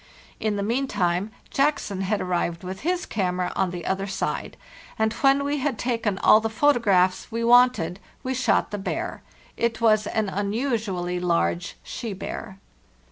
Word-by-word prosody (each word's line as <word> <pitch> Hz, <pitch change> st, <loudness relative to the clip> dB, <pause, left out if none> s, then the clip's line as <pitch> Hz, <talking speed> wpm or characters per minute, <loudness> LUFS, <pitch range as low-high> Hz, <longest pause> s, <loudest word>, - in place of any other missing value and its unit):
In 215 Hz, -1 st, 0 dB
the 200 Hz, -, -1 dB
meantime, 205 Hz, -6 st, 0 dB, 0.2 s
Jackson 275 Hz, -9 st, 0 dB
had 200 Hz, +2 st, 0 dB
arrived 175 Hz, -1 st, -1 dB
with 185 Hz, +1 st, -6 dB
his 355 Hz, +3 st, -1 dB
camera 180 Hz, -3 st, -1 dB
on 190 Hz, -1 st, +1 dB
the 175 Hz, -2 st, -6 dB
other 195 Hz, +1 st, -1 dB
side; 195 Hz, -, -3 dB, 0.4 s
and 220 Hz, 0 st, +1 dB
when 275 Hz, +3 st, +3 dB
we 285 Hz, +1 st, 0 dB
had 270 Hz, -3 st, -1 dB
taken 230 Hz, -4 st, -1 dB
all 215 Hz, -, +8 dB
the 225 Hz, 0 st, -2 dB
photo 285 Hz, +4 st, +3 dB
eraphs 185 Hz, -2 st, +2 dB
we 230 Hz, +1 st, -2 dB
wanted 235 Hz, -8 st, +4 dB, 0.2 s
we 260 Hz, -, -1 dB
shot 255 Hz, -, +1 dB
the 205 Hz, -, -3 dB
bear. 195 Hz, -, -3 dB, 0.4 s
It 235 Hz, -1 st, 0 dB
was 215 Hz, -2 st, +3 dB
an 220 Hz, -2 st, 0 dB
un 200 Hz, +1 st, -2 dB
usually 210 Hz, -8 st, -1 dB
large 170 Hz, -1 st, 0 dB
she 230 Hz, -4 st, -5 dB
bear." 195 Hz, +1 st, -6 dB
210 Hz, 165 wpm, -25 LUFS, 185-235 Hz, 0.4 s, all